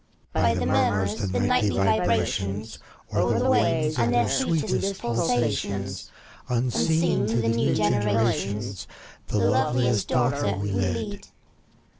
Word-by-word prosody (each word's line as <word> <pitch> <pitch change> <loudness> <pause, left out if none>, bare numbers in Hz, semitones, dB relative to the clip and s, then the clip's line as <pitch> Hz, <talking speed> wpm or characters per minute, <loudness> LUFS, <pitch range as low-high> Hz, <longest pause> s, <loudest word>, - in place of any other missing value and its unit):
By - - +2
the - - -1
murmurs, 100 +1 0
the 95 +1 -1
nightly 105 -4 +1
vibrations, 100 +1 0 0.3
O'er - - +1
the - - +1
waves 155 -2 +2
and 120 0 +2
their 120 0 +2
sweetest 165 +7 0
pulsations. 115 - -1 0.4
Unseen 130 +5 +1
to 110 - -1
the 115 -1 +1
new 115 0 +1
generations, 105 -1 0 0.4
The - - -2
loveliest 120 +2 +1
daughter 125 -5 0
we 100 +1 -3
lead. 95 - -3
110 Hz, 115 wpm, -25 LUFS, 100-125 Hz, 0.4 s, By